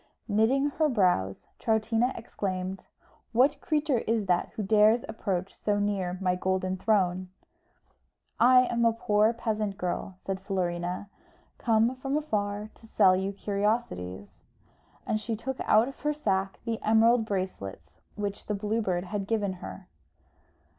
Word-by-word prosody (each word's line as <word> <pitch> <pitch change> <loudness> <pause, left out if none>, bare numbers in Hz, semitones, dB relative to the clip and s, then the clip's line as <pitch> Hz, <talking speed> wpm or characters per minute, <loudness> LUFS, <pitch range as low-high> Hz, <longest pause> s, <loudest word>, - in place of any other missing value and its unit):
Knitting 250 +7 +2
her 310 -1 +4
brows, 180 - +1
Troutina 225 +2 +1
exclaimed, 190 -4 -4 0.5
"What 275 +4 +3
creature 300 -6 +1
is 225 -2 0
that 180 -2 +1
who 215 - -2
dares 215 +3 +4
approach 195 -4 -3
so 205 -1 -1
near 195 -3 -1
my 185 -2 +1
golden 185 0 -1
throne?" 185 -3 +1 1.1
"I 250 +1 +7
am 235 -2 0
a 230 -1 +4
poor 215 -1 +2
peasant 215 -4 -2
girl," 185 0 -3
said 190 -1 -2
Florina. 180 -1 -2 0.5
"I - - -22
come 230 +2 +3
from 270 +2 -1
afar 210 -7 -2
to 225 - -18
sell 195 -4 +5
you 190 +1 -1
curiosities." 200 - -2 0.6
And 215 - -1
she 225 +1 -2
took 260 +4 -4
out 220 +3 +5
of 275 - -9
her 300 0 0
sack 195 -9 -1
the 230 -1 -2
emerald 225 +1 +4
bracelets 100 - -5
which 205 -1 -4
the 210 - -1
Blue 210 +3 -1
Bird 180 -4 -1
had 195 +1 -4
given 205 -4 0
her. 95 -1 -8
210 Hz, 145 wpm, -28 LUFS, 190-230 Hz, 1.1 s, I